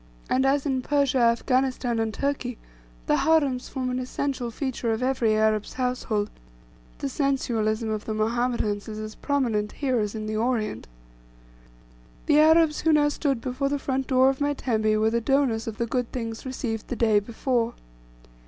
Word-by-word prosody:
And, 265 +1 +3
as 275 +1 +2
in 265 -3 0
Persia, 280 -1 +1
Afghanistan, 245 0 +1
and 225 -1 0
Turkey, 255 -1 -2 0.5
the - - +2
harems 285 -6 +2
form 255 -2 -3
an 250 - -1
essential 255 -1 -3
feature 245 -1 -2
of 220 +3 -2
every 250 -4 +2
Arab's 215 -1 +1
household; 250 -5 -1 0.7
the - - -3
sensualism 225 - 0
of 215 -1 -3
the 220 - -3
Mohammedans 220 -2 0
is 215 -1 -6
as 215 0 -6
prominent 230 -8 -1
here 260 -4 0
as 210 0 -2
in 215 -1 -4
the 215 0 -3
Orient. 220 - -1 1.4
The 295 - +4
Arabs 315 0 +5
who 320 - +3
now 295 -1 +4
stood 280 -4 -1
before 260 +2 -2
the 285 - 0
front 270 -1 -2
door 260 0 +4
of 270 - -8
my 290 0 +1
tembe 215 -5 +1
were 220 +1 +2
the 235 0 +1
donors 245 -3 +1
of 220 -1 -5
the 235 - 0
good 245 +1 -2
things 230 0 -5
received 235 -4 -4
the - - -3
day 220 -3 +3
before. 235 +2 -1
250 Hz, 170 wpm, -25 LUFS, 220-270 Hz, 1.4 s, Arabs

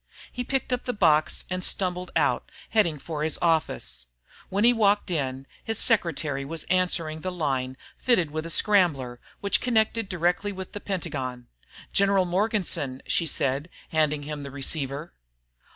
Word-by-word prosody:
He 250 - -3
picked 265 0 -1
up 250 - -2
the 250 - -1
box 155 -7 +3
and 185 0 -1
stumbled 180 -1 0
out, - - +1 0.2
heading 180 -9 +3
for 150 +1 -5
his 155 -1 +1
office. 160 - 0 0.4
When 200 +2 0
he 240 +1 +7
walked 205 -4 +2
in, 135 -4 -2 0.2
his 225 -1 -2
secretary 160 - +3
was 160 +3 -4
answering 170 -4 +1
the 185 - -3
line 135 -6 -2 0.2
fitted 185 - +2
with 155 +2 -3
a - - -6
scrambler, 155 - +2 0.2
which 200 - +2
connected 225 -3 +1
directly 180 +3 0
with 190 -1 -7
the 205 - -7
Pentagon. 130 -10 -4 0.4
"General 195 -1 +4
Morganson," 180 - 0
she 165 - +1
said, 140 +2 -1 0.2
handing 150 -2 +1
him 150 0 -5
the 140 - -6
receiver. 140 +2 -2
170 Hz, 150 wpm, -26 LUFS, 145-200 Hz, 0.4 s, he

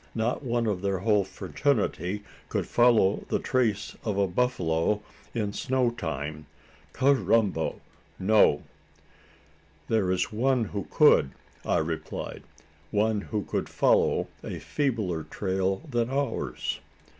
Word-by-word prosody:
Not 115 +2 0
one 120 -2 0
of 100 -4 -1
their 100 -1 0
whole 105 +2 +2
fraternity 105 - -1 0.3
could - - -1
follow 120 -5 +4
the - - +2
trace 115 -5 0
of 105 -3 -1
a 100 - +3
buffalo 95 -2 0 0.3
in 105 -3 -1
snow 130 -3 +1
time. 75 -7 -5 0.4
Carrambo! 115 - +2 0.4
No." 105 +3 +4 1.3
"There 110 -5 +2
is 90 0 0
one 125 +2 +2
who 100 -2 -5
could," 70 - +5 0.3
I - - +1
replied; 80 0 -4 0.5
"one 105 0 +1
who 105 0 -3
could - - -3
follow - - +3 0.2
a - - -5
feebler 110 - -1
trail 95 - -1
than 120 -3 0
ours." 140 +1 -2
105 Hz, 120 wpm, -27 LUFS, 95-120 Hz, 1.3 s, could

